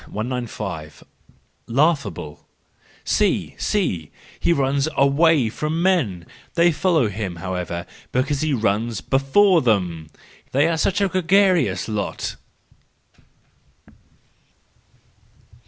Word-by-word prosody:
195 110 - -5 0.3
* - - -41
Laughable1 125 - 0 0.6
—See! - - 0
See! 90 - -1 0.3
He - - +1
runs 140 -1 +1
away 140 -1 +4
from 150 +7 -3
men—: 125 - +1 0.3
they 170 0 +4
follow 160 - +2
him, 100 -3 -4
however, 90 -1 -4 0.3
because 135 +2 0
he 155 -1 0
runs 110 -2 0
before 165 +7 +3
them,—they 100 - -1
are 165 -1 0
such 190 +4 +1
a 200 - +3
gregarious 180 - +2
lot! 105 -2 -3
130 Hz, 90 wpm, -22 LUFS, 100-165 Hz, 0.6 s, away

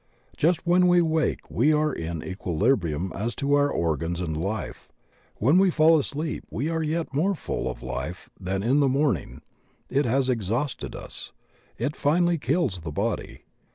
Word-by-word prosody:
Just 170 +2 +1
when 180 +1 +4
we 175 0 +5
wake 160 -2 +1
we 135 +8 +3
are 150 -1 +2
in 80 -3 -4
equilibrium 90 - 0
as 115 +4 -3
to 140 +1 0
our 145 0 +4
organs 85 - -1
and 80 -4 -2
life; 100 +7 -4 0.5
when 145 - +4
we 195 0 +5
fall 160 -1 +5
asleep 150 +2 -3
we 140 +8 -2
are 165 -1 -1
yet 160 0 -2
more 185 +8 +1
full - - -3
of - - -7
life 65 +8 -5
than 95 +1 -2
in 130 +6 +3
the 140 -2 +4
morn 135 - +2
ing; - - -12 0.5
it 140 +2 +2
has 130 +2 +1
exhausted 120 +3 -2
us; - - -9 0.4
it 150 - -2
finally 170 +3 +2
kills 130 - 0
the 80 -1 -5
body. - - -3
135 Hz, 170 wpm, -25 LUFS, -, 0.5 s, we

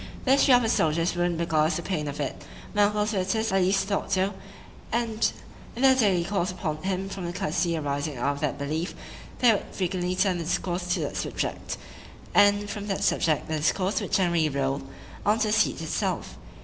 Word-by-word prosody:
The 260 - +3
history 270 -1 +6
of 245 - +3
a - - +1
soldier's 165 -3 +1
wound 175 -1 0
beguiles 160 -1 +1
the 170 - -3
pain 155 -6 -2
of 145 +1 -5
it;—my 150 +8 -4
uncle's 210 +1 0
visitors 205 +2 0
at 195 0 +3
least 195 +1 +2
thought 200 -1 -2
so, 190 +2 +1 0.6
and 230 -2 +1 0.4
in 245 - -3
their 265 -1 +7
daily 200 -9 +3
calls 190 0 -1
upon 180 -4 -3
him, 190 +3 -2
from 195 -2 -5
the - - -3
courtesy 180 -2 -1
arising 145 -1 -2
out 140 +4 0
of 140 - -8
that 150 -2 -1
belief, 155 +5 -3 0.4
they 245 -2 +5
would 205 - -2
frequently 180 -1 -1
turn 185 -1 +1
the - - -3
discourse 180 +1 -2
to - - -2
that - - -3
subject,—and 205 0 -1
from 205 0 -5
that 195 - -1
subject 155 -3 +1
the 155 - -1
discourse 185 +6 +1
would - - -5
generally 170 -5 +2
roll 140 0 -1 0.4
on 210 +2 +3
to 220 -1 +1
the - - +1
siege 215 - +2
itself. - - -2
185 Hz, 195 wpm, -26 LUFS, 160-205 Hz, 0.6 s, their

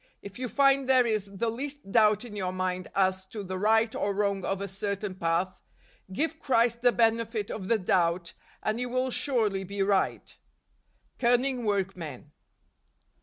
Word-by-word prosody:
If 200 +3 -9
you 255 - -2
find 275 0 +3
there 255 -2 +5
is 215 -3 0
the 225 +4 -1
least 275 -2 -6
doubt 215 0 +4
in 215 -3 -9
your 185 -3 -2
mind 185 0 -2
as 190 -1 +2
to 205 +1 -6
the 185 0 -4
right 220 +2 +3
or 200 -1 -1
wrong 200 -1 0
of 195 +1 -1
a 200 - -3
certain 200 0 -3
path, 180 +1 -1 0.5
give 320 +10 -1
Christ 235 -3 +2
the 245 0 +5
benefit 225 -2 +1
of 190 -3 -5
the 230 - +3
doubt 175 -2 +1 0.3
and 215 +2 -1
you 250 0 -2
will 255 +1 0
surely 220 -9 0
be 200 +1 -2
right. 195 -1 0 0.8
Cunning 245 0 +2
Workmen. 180 - -3
210 Hz, 165 wpm, -28 LUFS, 190-240 Hz, 0.8 s, there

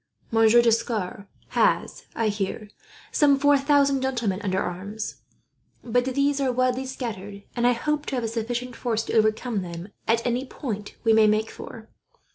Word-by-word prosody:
Monsieur 225 +1 +5
D'Escars 220 -4 0 0.2
has, - - +1
I 225 -2 +1
hear, 210 +1 -3 0.4
some 285 -2 +4
four 285 +1 +4
thousand 280 -1 +3
gentlemen 235 -7 -1
under 190 -3 0
arms; 200 +5 -5 0.6
but 245 +1 +1
these 280 +2 +1
are 265 -2 +2
widely 255 +1 0
scattered, 205 -6 -6
and 240 0 +2
I 245 - +5
hope 300 +5 -2
to 275 - -2
have 245 - -1
a - - 0
sufficient 240 +2 -3
force 225 -3 -1
to - - -5
overcome 220 0 +1
them 175 +1 -7 0.2
at 230 +1 +2
any 245 +1 0
point 215 -6 -6
we 225 -1 +4
may 220 -1 +6
make 215 +1 +1
for. 225 -2 -10
230 Hz, 165 wpm, -25 LUFS, 215-260 Hz, 0.6 s, may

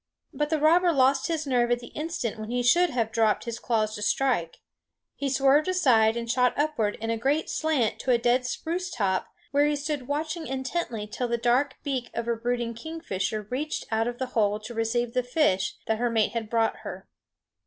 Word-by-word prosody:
But 295 0 -1
the 315 - +1
robber 340 +4 +4
lost 270 -2 +3
his 320 -3 -2
nerve 245 -3 +2
at 240 - +3
the 240 0 -11
instant 295 -8 -4
when 215 0 -6
he 245 +1 0
should 345 +9 +4
have 230 -3 -1
dropped 220 -2 +2
his 235 -1 -5
claws 215 -2 0
to 210 - -6
strike. 210 -7 0 0.6
He 280 - -2
swerved 275 +4 +3
aside 240 -12 +3
and 235 0 -4
shot 250 +1 +2
upward 285 -9 0
in 225 +1 -2
a 230 - 0
great 280 +6 0
slant 305 -8 0
to - - -5
a 245 - +5
dead 245 +2 +2
spruce 345 +7 -3
top, 195 - -1 0.2
where 285 +1 +3
he 295 - +1
stood 290 -3 -3
watching 310 +3 -3
intently 260 -4 -3
till 245 +4 -3
the 235 0 0
dark 245 +4 +2
beak 260 -4 -2
of 235 0 -3
a 235 - +1
brooding 235 0 -2
kingfisher 225 - -4
reached 300 +5 -2
out 225 +1 +1
of 240 0 -4
the 260 - -2
hole 210 -2 +2
to 220 +3 -8
receive 230 +1 -1
the 250 - +2
fish 245 -6 +1
that 220 0 0
her 240 0 +1
mate 220 -3 +2
had 225 -2 -4
brought 225 -1 +1
her. - - -8
245 Hz, 205 wpm, -26 LUFS, 225-290 Hz, 0.6 s, a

